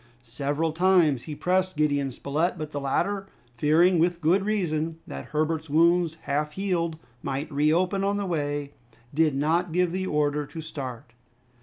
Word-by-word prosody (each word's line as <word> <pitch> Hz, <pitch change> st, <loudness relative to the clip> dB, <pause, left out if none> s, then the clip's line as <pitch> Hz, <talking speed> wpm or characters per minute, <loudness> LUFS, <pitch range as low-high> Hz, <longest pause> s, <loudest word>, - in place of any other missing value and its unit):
Several 145 Hz, +7 st, -1 dB
times 170 Hz, -6 st, +3 dB
he 150 Hz, -, -5 dB
pressed 185 Hz, +1 st, 0 dB
Gideon 145 Hz, -3 st, +1 dB
Spilett, 150 Hz, +8 st, -1 dB
but 155 Hz, -1 st, -5 dB
the 145 Hz, -, -3 dB
latter, 195 Hz, +8 st, -1 dB, 0.3 s
fearing, 165 Hz, +7 st, +4 dB
with 175 Hz, +1 st, +2 dB
good 175 Hz, +4 st, +3 dB
reason, 165 Hz, -6 st, -1 dB
that 70 Hz, 0 st, -7 dB
Herbert's 155 Hz, +1 st, -1 dB
wounds, 170 Hz, +2 st, +3 dB
half 150 Hz, +1 st, -1 dB
healed, 170 Hz, -4 st, -1 dB, 0.2 s
might 140 Hz, +4 st, -3 dB
reopen 170 Hz, +7 st, +2 dB
on 200 Hz, +1 st, +1 dB
the 200 Hz, -, -2 dB
way, 145 Hz, -4 st, -2 dB, 0.4 s
did 155 Hz, -1 st, +2 dB
not 165 Hz, +5 st, +1 dB
give 180 Hz, +1 st, +2 dB
the 185 Hz, +1 st, -2 dB
order 150 Hz, -1 st, 0 dB
to 165 Hz, -, -8 dB
start. 130 Hz, -7 st, -7 dB
160 Hz, 155 wpm, -26 LUFS, 145-180 Hz, 0.4 s, fearing